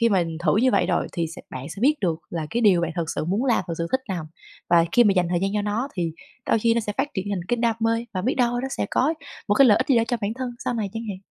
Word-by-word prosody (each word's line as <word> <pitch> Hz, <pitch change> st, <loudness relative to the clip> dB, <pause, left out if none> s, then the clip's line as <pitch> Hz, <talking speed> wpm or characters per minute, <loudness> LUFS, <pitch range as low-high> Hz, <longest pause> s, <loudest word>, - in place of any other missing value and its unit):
khi 230 Hz, -, +4 dB
mà 190 Hz, -5 st, +2 dB, 0.2 s
thử 170 Hz, +2 st, +2 dB
như 255 Hz, +3 st, +4 dB
vậy -, -, +2 dB
rồi 180 Hz, -, 0 dB
thì 170 Hz, -1 st, -1 dB
sẽ -, -, -9 dB
bạn 130 Hz, +1 st, -6 dB
sẽ 200 Hz, -, -8 dB
biết 290 Hz, +5 st, +4 dB
được 170 Hz, -5 st, +1 dB
là 160 Hz, -3 st, -3 dB
cái 235 Hz, -, 0 dB
điều 195 Hz, -6 st, +5 dB
bạn 170 Hz, -, -1 dB
thực 165 Hz, -2 st, -2 dB
sự -, -, -2 dB
muốn 200 Hz, +9 st, 0 dB
làm 245 Hz, -4 st, +2 dB
thật 165 Hz, -, -3 dB
sự 170 Hz, -, -1 dB
thích 260 Hz, -, +2 dB
làm. 175 Hz, -5 st, -3 dB, 0.4 s
Và 170 Hz, -1 st, +5 dB
khi 240 Hz, -, +6 dB
mà 200 Hz, -, +5 dB
dành 175 Hz, -1 st, +2 dB
thời 175 Hz, -, +1 dB
gian 195 Hz, +1 st, 0 dB
cho 205 Hz, -, +1 dB
nó, 215 Hz, +6 st, -1 dB
thì 170 Hz, -3 st, -2 dB, 0.3 s
đôi 225 Hz, -, +3 dB
khi 230 Hz, +1 st, +2 dB
nó 235 Hz, -, +2 dB
sẽ 210 Hz, -1 st, -4 dB
phát 285 Hz, +2 st, +1 dB
triển 190 Hz, 0 st, -3 dB
thành 195 Hz, -, -1 dB
cái 240 Hz, -, +1 dB
đam 230 Hz, -1 st, +1 dB
mê 230 Hz, +1 st, +1 dB
và 185 Hz, -, -1 dB
biết 255 Hz, -, +1 dB
đâu 245 Hz, -1 st, +1 dB
nó 265 Hz, -, -3 dB
sẽ -, -, -2 dB
có 300 Hz, +5 st, +2 dB, 0.3 s
một 205 Hz, -, +4 dB
cái 275 Hz, +2 st, +6 dB
lợi 210 Hz, -, +6 dB
ích -, -, -1 dB
gì 265 Hz, -, +4 dB
cho 240 Hz, -, +1 dB
bản 205 Hz, +2 st, -2 dB
thân 255 Hz, -1 st, -4 dB
sau 245 Hz, -, -1 dB
này 210 Hz, -4 st, -2 dB
chẳng 225 Hz, -, -4 dB
hạn. 190 Hz, -2 st, -4 dB
210 Hz, 325 wpm, -24 LUFS, 175-240 Hz, 0.4 s, khi